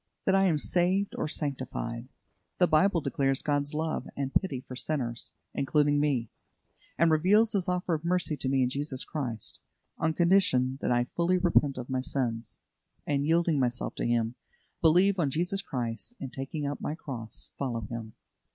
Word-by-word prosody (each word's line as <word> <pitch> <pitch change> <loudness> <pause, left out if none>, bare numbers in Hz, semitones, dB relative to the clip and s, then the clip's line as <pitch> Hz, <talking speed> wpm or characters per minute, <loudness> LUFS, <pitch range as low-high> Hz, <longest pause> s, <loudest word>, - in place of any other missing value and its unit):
that 190 - +3
I 195 0 +4
am 165 -4 +2
saved 185 +5 +1
or - - -2
sanctified? 130 -5 -3 0.5
The 180 - +5
Bible 170 +2 +3
declares 135 -3 +1
God's 145 0 0
love 160 +1 -2
and 135 -1 -2
pity 140 -10 0
for 130 - -9
sinners, 125 -4 -3 0.2
including 145 +1 +2
me, 135 -6 0 0.7
and 165 0 +4
reveals 200 +8 +4
His 195 -2 +1
offer 180 -1 0
of 155 0 -2
mercy 175 -2 +1
to 130 - -2
me 135 -1 +3
in 125 - +1
Jesus 140 -1 -1
Christ, 125 -8 -3 0.4
on 160 0 +1
condition 155 -8 +3
that - - 0
I 120 0 +3
fully 175 +2 +2
repent 165 -6 +2
of 125 -1 -5
my 130 -1 -1
sins, 120 -5 -2 0.5
and 145 0 0
yielding 165 -2 +3
myself 125 -1 -1
to - - -1
Him, 120 -1 +1 0.5
believe 180 +4 +4
on 150 -5 +2
Jesus 175 +7 0
Christ, 125 - -3
and 135 -2 -6
taking 140 +3 -4
up 140 0 -3
my 150 - -2
cross, 120 -8 -5
follow 120 -4 -2
Him. 110 0 -6
145 Hz, 170 wpm, -29 LUFS, 130-170 Hz, 0.7 s, The